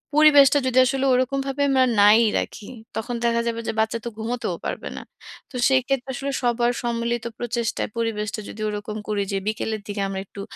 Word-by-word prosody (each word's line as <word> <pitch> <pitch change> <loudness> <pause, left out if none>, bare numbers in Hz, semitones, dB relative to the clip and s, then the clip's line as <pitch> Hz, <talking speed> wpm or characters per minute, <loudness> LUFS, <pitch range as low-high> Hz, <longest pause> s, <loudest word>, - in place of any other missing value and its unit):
পরিবেশটা 290 -2 +7
যদি 255 0 0
আসলে 270 +1 0
ওইরকমভাবে 270 +2 0
আমরা 265 -1 +4 0.2
নাই 210 +3 +7 0.2
রাখি, 205 - -6 0.3
তখন 235 +2 -3
দেখা 235 0 +2
যাবে 230 0 -2
যে - - -1
বাচ্চা 220 +1 +1
তো 235 - -2
ঘুমাতেও 235 +2 -3
পারবে - - -4
না। - - -5 0.5
তো - - -11
সেই 265 -1 +4
ক্ষেত্রে 270 -1 -1
আসলে 275 +2 -3
সবার 240 0 +2
সম্মিলিত 235 0 -1
প্রচেষ্টায় 235 -1 -2
পরিবেশটা 215 -1 -2
যদি 215 - -8
ওরকম 210 +1 -5
করি 210 -1 0
যে 195 - 0
বিকেলের 220 0 -2
দিকে 205 0 -3
আমরা 195 0 -4
একটু 200 - -9
235 Hz, 180 wpm, -23 LUFS, 220-260 Hz, 0.5 s, পরিবেশটা